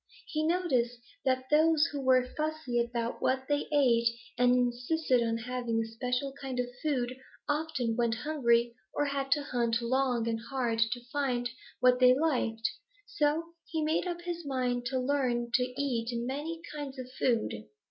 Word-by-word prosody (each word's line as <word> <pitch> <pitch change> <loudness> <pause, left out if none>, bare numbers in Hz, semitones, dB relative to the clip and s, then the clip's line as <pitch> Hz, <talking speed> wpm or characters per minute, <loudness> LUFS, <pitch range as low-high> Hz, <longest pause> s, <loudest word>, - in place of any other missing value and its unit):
He 310 - -2
noticed 260 -9 +1 0.3
that 260 0 0
those 315 +1 +5
who 285 -1 -3
were 255 -1 +3
fussy 310 -5 -1
about 235 0 -3
what 265 0 +1
they 290 0 0
ate 240 -5 +4 0.3
and 245 0 +4
insisted 250 +2 +1
on 230 -1 0
having 240 -1 -2
a 225 - 0
special 250 +4 -2
kind 260 -2 -3
of 250 - +2 0.2
food 255 -5 0 0.3
often 290 -6 0
went 235 -1 +1
hungry 240 -3 +2 0.2
or 290 - +2
had 275 -1 -2
to 290 - -2
hunt 235 -3 0
long 245 -1 +1
and 225 -1 0
hard 245 -4 0
to 240 +2 +1
find 250 -4 0 0.3
what 250 0 +5
they 250 0 +7
liked, 250 -7 +1 0.4
so 330 -4 0
he 320 -2 -1
made 315 +3 +1
up 345 -1 -3
his 345 -1 -4
mind 250 -3 -1
to 260 +1 -1
learn 250 -3 0
to 250 - +4 0.2
eat 240 -5 0
many 290 +7 -3
kinds 285 -2 -5
of 255 -1 -6
food. 225 - 0
255 Hz, 165 wpm, -30 LUFS, 240-290 Hz, 0.4 s, they